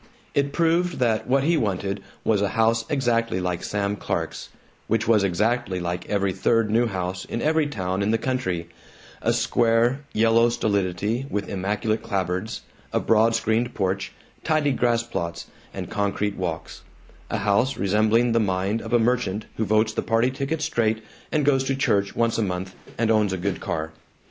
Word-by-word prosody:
It 140 Hz, 0 st, +1 dB
proved 170 Hz, +2 st, +1 dB
that 115 Hz, -3 st, +1 dB
what 135 Hz, +2 st, +3 dB
he 165 Hz, +3 st, +3 dB
wanted 100 Hz, -4 st, -1 dB, 0.2 s
was 105 Hz, -3 st, +2 dB
a 100 Hz, -, +1 dB
house 115 Hz, 0 st, +3 dB
exactly 115 Hz, -7 st, +1 dB
like 90 Hz, -1 st, -2 dB
Sam 100 Hz, 0 st, -1 dB
Clark's, -, -, -4 dB, 0.4 s
which 115 Hz, +1 st, 0 dB
was 110 Hz, -3 st, +4 dB
exactly 100 Hz, +2 st, 0 dB
like 90 Hz, 0 st, -4 dB
every 100 Hz, -2 st, +1 dB
third 115 Hz, +1 st, +2 dB
new 120 Hz, +2 st, +3 dB
house 90 Hz, -2 st, -3 dB
in -, -, -4 dB
every 155 Hz, +2 st, +2 dB
town 95 Hz, -8 st, -2 dB
in 100 Hz, -, +1 dB
the 115 Hz, -, +3 dB
country: 110 Hz, -11 st, -2 dB, 0.5 s
a -, -, +2 dB
square, 120 Hz, +3 st, +2 dB
yellow 115 Hz, +1 st, +4 dB
stolidity 105 Hz, +3 st, -1 dB
with 100 Hz, -1 st, -2 dB
immaculate 105 Hz, +3 st, -1 dB
clapboards, 95 Hz, +2 st, -2 dB, 0.3 s
a -, -, +1 dB
broad 115 Hz, +1 st, +3 dB
screened 115 Hz, +3 st, 0 dB
porch, 95 Hz, 0 st, -1 dB, 0.3 s
tidy 155 Hz, -2 st, +2 dB
grass 120 Hz, -2 st, +1 dB
plots, 85 Hz, -7 st, -4 dB, 0.3 s
and -, -, -6 dB
concrete 100 Hz, 0 st, -1 dB
walks; 85 Hz, -3 st, -4 dB, 0.5 s
a -, -, -1 dB
house 105 Hz, +6 st, +1 dB
resembling 110 Hz, +4 st, +3 dB
the 115 Hz, -, +3 dB
mind 100 Hz, +1 st, 0 dB
of 115 Hz, -, -6 dB
a 120 Hz, -, +5 dB
merchant 115 Hz, -3 st, 0 dB
who 110 Hz, -, 0 dB
votes 110 Hz, +2 st, +2 dB
the -, -, -1 dB
party 115 Hz, +2 st, +2 dB
ticket 140 Hz, +4 st, -2 dB
straight 110 Hz, -7 st, 0 dB, 0.3 s
and 150 Hz, -2 st, +1 dB
goes 135 Hz, -2 st, +3 dB
to 135 Hz, 0 st, 0 dB
church 100 Hz, -7 st, +1 dB
once 115 Hz, -1 st, +1 dB
a -, -, +2 dB
month 95 Hz, -2 st, -3 dB, 0.2 s
and 115 Hz, -1 st, +2 dB
owns 105 Hz, -3 st, +2 dB
a -, -, -1 dB
good 90 Hz, +1 st, -2 dB
car. 80 Hz, 0 st, -3 dB
110 Hz, 175 wpm, -24 LUFS, 100-120 Hz, 0.5 s, a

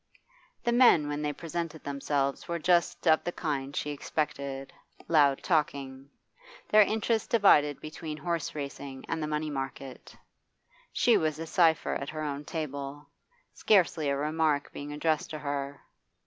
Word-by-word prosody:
The 240 Hz, -, +1 dB
men 235 Hz, -, +5 dB
when 145 Hz, 0 st, -3 dB
they 150 Hz, -1 st, -1 dB
presented 165 Hz, +1 st, -5 dB
themselves 140 Hz, 0 st, -2 dB
were 170 Hz, -, -2 dB
just 175 Hz, +2 st, +1 dB
of 155 Hz, -1 st, +5 dB
the 175 Hz, -, -2 dB
kind 140 Hz, -4 st, -3 dB
she 150 Hz, -, -2 dB
expected 140 Hz, -2 st, -3 dB, 0.3 s
loud 145 Hz, -4 st, +4 dB
talking 140 Hz, -5 st, -1 dB, 0.6 s
their 215 Hz, -, +7 dB
interests 220 Hz, +2 st, +1 dB
divided 150 Hz, -, +4 dB
between 155 Hz, 0 st, -7 dB
horse 165 Hz, 0 st, -3 dB
racing 140 Hz, -2 st, -6 dB
and 160 Hz, -, -2 dB
the 150 Hz, -, -2 dB
money 150 Hz, 0 st, -2 dB
market; 135 Hz, -1 st, -6 dB, 0.7 s
she 235 Hz, -3 st, +4 dB
was 155 Hz, -4 st, 0 dB
a 165 Hz, -, -5 dB
cipher 165 Hz, -1 st, +2 dB
at 140 Hz, -, -4 dB
her 155 Hz, 0 st, -5 dB
own 145 Hz, 0 st, -4 dB
table, 145 Hz, -2 st, -5 dB, 0.4 s
scarcely 175 Hz, -7 st, +2 dB
a 140 Hz, -, 0 dB
remark 150 Hz, 0 st, 0 dB
being 145 Hz, +1 st, -7 dB
addressed 155 Hz, +1 st, 0 dB
to 155 Hz, -, -5 dB
her. 140 Hz, -1 st, -4 dB
150 Hz, 150 wpm, -29 LUFS, 140-165 Hz, 0.7 s, their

